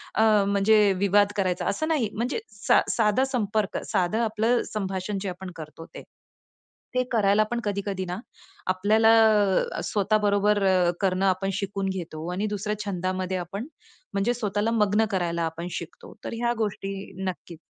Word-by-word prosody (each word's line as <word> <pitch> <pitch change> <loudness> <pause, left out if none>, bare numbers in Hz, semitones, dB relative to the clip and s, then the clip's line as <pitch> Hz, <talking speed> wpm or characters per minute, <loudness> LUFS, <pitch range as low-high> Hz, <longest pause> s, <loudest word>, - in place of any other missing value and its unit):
अ, - - +2 0.3
म्हणजे 200 +2 +3 0.2
विवाद 200 +1 +3
करायचा 185 -3 0
असं 315 +10 -1
नाही, 290 -10 +1
म्हणजे 245 - -2
सा 205 -1 +3
साधा 220 +2 +2
संपर्क, 215 -6 -1
साधं 195 +1 0
आपलं 225 +2 +1
संभाषण 195 -1 -3
जे 195 - -3
आपण 185 +1 -7
करतो 160 +1 -9
ते. - - -11 0.9
ते 255 - +3
करायला 210 -2 +3
पण 240 - 0
कधी-कधी 200 -2 -2
ना 180 0 -4 0.5
आपल्याला 210 +4 +3 0.7
अ, - - -2
स्वतः 205 +1 +1
बरोबर 205 0 +3 0.4
करणं 190 0 +1
आपण 190 +1 +1
शिकून 195 0 -2
घेतो 165 -4 -5
आणि 200 +4 -1
दुसऱ्या 210 +1 -3
छंदामध्ये 185 -1 -2
आपण 195 - -5 0.5
म्हणजे 200 +5 +1
स्वतःला 210 -2 -1
मग्न 210 -1 +2
करायला 170 -3 -1
आपण 165 +2 -5
शिकतो, 460 - -8
तर - - -4
ह्या 240 0 +1
गोष्टी 200 -2 -2 0.3
नक्कीच 175 -3 -6
200 Hz, 150 wpm, -25 LUFS, 185-215 Hz, 0.9 s, म्हणजे